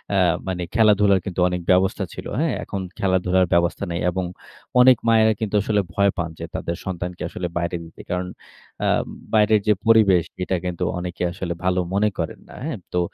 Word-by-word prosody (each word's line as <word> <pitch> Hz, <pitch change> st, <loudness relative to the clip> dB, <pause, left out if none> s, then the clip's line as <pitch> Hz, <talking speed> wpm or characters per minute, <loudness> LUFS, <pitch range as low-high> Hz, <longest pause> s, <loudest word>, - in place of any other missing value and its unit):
আ -, -, +3 dB, 0.3 s
মানে 90 Hz, -1 st, -2 dB
খেলাধুলার 105 Hz, -3 st, +4 dB
কিন্তু 95 Hz, -2 st, -4 dB
অনেক 90 Hz, 0 st, -3 dB
ব্যবস্থা 95 Hz, +1 st, +2 dB
ছিল, -, -, -8 dB
হ্যাঁ? -, -, +1 dB
এখন 100 Hz, -, -4 dB, 0.2 s
খেলাধুলার 95 Hz, -1 st, +2 dB
ব্যবস্থা 85 Hz, 0 st, +1 dB
নেই। 85 Hz, -, -2 dB
এবং 95 Hz, 0 st, -2 dB, 0.6 s
অনেক 125 Hz, -1 st, +7 dB
মায়েরা 110 Hz, -1 st, +5 dB
কিন্তু 105 Hz, -2 st, -2 dB
আসলে 105 Hz, -1 st, +1 dB
ভয় 100 Hz, +1 st, +3 dB
পান 85 Hz, -1 st, -2 dB
যে -, -, -4 dB
তাদের 85 Hz, -, -3 dB
সন্তানকে 90 Hz, -1 st, -4 dB
আসলে 90 Hz, -, -4 dB
বাইরে 85 Hz, 0 st, -1 dB
দিতে। 80 Hz, -, -13 dB
কারণ 90 Hz, 0 st, -2 dB, 0.6 s
আ -, -, +2 dB, 0.5 s
বাইরের 105 Hz, -1 st, +4 dB
যে 105 Hz, -, +6 dB
পরিবেশ 100 Hz, -7 st, +5 dB
সেটা 95 Hz, 0 st, -1 dB
কিন্তু 90 Hz, -2 st, -2 dB, 0.2 s
অনেকে 90 Hz, 0 st, -4 dB
আসলে 90 Hz, -1 st, -4 dB
ভালো 90 Hz, 0 st, +2 dB
মনে 105 Hz, +2 st, +3 dB
করেন -, -, -3 dB
না, -, -, -12 dB
হ্যাঁ? 150 Hz, -9 st, -4 dB
তো 90 Hz, -, +2 dB
95 Hz, 185 wpm, -22 LUFS, 90-105 Hz, 0.6 s, অনেক